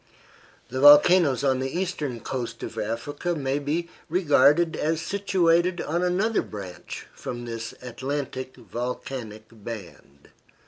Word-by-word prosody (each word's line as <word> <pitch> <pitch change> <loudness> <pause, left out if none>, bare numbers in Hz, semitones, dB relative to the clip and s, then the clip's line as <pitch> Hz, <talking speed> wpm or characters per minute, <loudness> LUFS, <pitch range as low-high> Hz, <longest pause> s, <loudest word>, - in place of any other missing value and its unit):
The 130 +2 -3
volcanoes 145 -1 +7
on 130 -2 +2
the 130 +5 -3
eastern 150 -10 -3
coast 125 0 -5
of - - -6
Africa 145 +10 -3
may 140 -1 -1
be 155 +4 -2 0.2
regarded 165 -1 +4
as 160 +1 0
situated 180 -2 +2
on 170 +3 -1
another 190 +5 +1
branch 95 -4 -8
from 120 -1 -6
this 115 -1 -6
Atlantic 130 +1 -4
volcanic 120 -3 -5
band. 100 -10 -10
140 Hz, 120 wpm, -25 LUFS, 120-170 Hz, 0.2 s, volcanoes